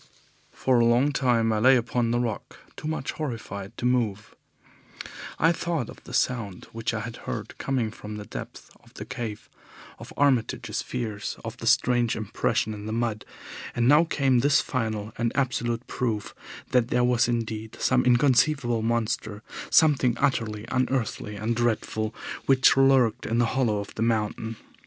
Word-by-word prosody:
For 130 Hz, -2 st, +2 dB
a 115 Hz, -, +4 dB
long 120 Hz, +5 st, +3 dB
time 120 Hz, -5 st, +2 dB
I 110 Hz, -, +1 dB
lay 130 Hz, +4 st, +6 dB
upon 120 Hz, 0 st, 0 dB
the 120 Hz, +1 st, +1 dB
rock, 115 Hz, -5 st, -4 dB, 0.2 s
too -, -, -6 dB
much 155 Hz, -4 st, -2 dB
horrified 115 Hz, -9 st, -6 dB
to -, -, -4 dB
move. 110 Hz, -5 st, 0 dB, 1.0 s
I 165 Hz, -, +4 dB
thought 165 Hz, -7 st, -2 dB
of -, -, -15 dB
the -, -, -10 dB
sound 110 Hz, -7 st, -1 dB
which 115 Hz, +1 st, -2 dB
I 110 Hz, -2 st, -3 dB
had 115 Hz, +1 st, -7 dB
heard -, -, -5 dB
coming 125 Hz, -5 st, -1 dB
from 105 Hz, -1 st, -8 dB
the 105 Hz, -1 st, -7 dB
depths -, -, -9 dB
of -, -, -22 dB
the 105 Hz, -, -7 dB
cave, 115 Hz, -3 st, -6 dB, 0.5 s
of -, -, -10 dB
Armitage's 125 Hz, -5 st, +1 dB
fears, 110 Hz, -5 st, -4 dB
of -, -, -6 dB
the -, -, -5 dB
strange 120 Hz, -2 st, +3 dB
impression 110 Hz, 0 st, -1 dB
in 105 Hz, 0 st, -7 dB
the -, -, -3 dB
mud, 115 Hz, -2 st, -2 dB, 0.5 s
and 120 Hz, 0 st, +2 dB
now 150 Hz, +4 st, +7 dB
came 135 Hz, -6 st, +2 dB
this 140 Hz, +3 st, +4 dB
final 110 Hz, -4 st, -2 dB
and 115 Hz, -1 st, +1 dB
absolute 120 Hz, -3 st, -1 dB
proof 115 Hz, -5 st, -3 dB, 0.4 s
that 125 Hz, -2 st, +3 dB
there 125 Hz, 0 st, +1 dB
was 125 Hz, 0 st, +3 dB
indeed 110 Hz, -2 st, -3 dB
some 130 Hz, -1 st, +3 dB
inconceivable 125 Hz, -1 st, +3 dB
monster, 110 Hz, -2 st, -1 dB, 0.3 s
something 135 Hz, -6 st, +4 dB
utterly 110 Hz, -6 st, 0 dB
unearthly 125 Hz, -4 st, -1 dB
and 110 Hz, +3 st, -1 dB
dreadful, 110 Hz, -2 st, -1 dB, 0.4 s
which 130 Hz, -1 st, +5 dB
lurked 130 Hz, -3 st, +3 dB
in 115 Hz, -, 0 dB
the 120 Hz, -, +4 dB
hollow 120 Hz, -5 st, +1 dB
of 100 Hz, 0 st, -6 dB
the -, -, -5 dB
mountain. 115 Hz, 0 st, -1 dB
120 Hz, 165 wpm, -26 LUFS, 110-130 Hz, 1.0 s, now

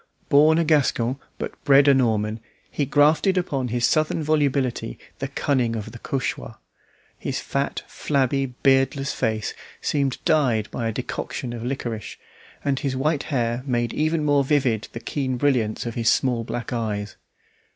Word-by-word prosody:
Born 155 Hz, +3 st, +6 dB
a 170 Hz, -, +3 dB
Gascon 140 Hz, -5 st, +2 dB, 0.2 s
but -, -, -6 dB
bred 140 Hz, 0 st, +6 dB
a 140 Hz, -, +7 dB
Norman, 110 Hz, -4 st, +1 dB, 0.3 s
he 145 Hz, -, -1 dB
grafted 155 Hz, +7 st, +4 dB
upon 140 Hz, -8 st, -1 dB
his 120 Hz, 0 st, +1 dB
southern 155 Hz, +3 st, +1 dB
volubility 140 Hz, -, 0 dB, 0.2 s
the -, -, -2 dB
cunning 125 Hz, -5 st, 0 dB
of 110 Hz, -2 st, -5 dB
the 120 Hz, -, -10 dB
Cauchois. 135 Hz, +1 st, -3 dB, 0.6 s
His -, -, -3 dB
fat, -, -, -2 dB
flabby, 135 Hz, -1 st, 0 dB, 0.2 s
beardless 135 Hz, 0 st, +3 dB
face 110 Hz, -1 st, -1 dB, 0.3 s
seemed 140 Hz, -3 st, 0 dB
dyed 130 Hz, -10 st, +2 dB
by 115 Hz, -, -2 dB
a -, -, 0 dB
decoction 120 Hz, +2 st, -4 dB
of 115 Hz, -1 st, -6 dB
liquorice, 120 Hz, -4 st, -4 dB, 0.5 s
and 140 Hz, -2 st, +1 dB
his 135 Hz, -3 st, -2 dB
white 150 Hz, +2 st, +1 dB
hair 120 Hz, -4 st, -1 dB
made 120 Hz, -2 st, 0 dB
even 155 Hz, 0 st, 0 dB
more 145 Hz, -1 st, +4 dB
vivid 130 Hz, -6 st, +1 dB
the 115 Hz, -, -6 dB
keen 130 Hz, +2 st, -2 dB
brilliance 120 Hz, -6 st, +1 dB
of 120 Hz, -, -3 dB
his 115 Hz, -1 st, +1 dB
small 125 Hz, -3 st, +1 dB
black 120 Hz, +3 st, -4 dB
eyes. 105 Hz, -3 st, -3 dB
130 Hz, 155 wpm, -23 LUFS, 115-145 Hz, 0.6 s, a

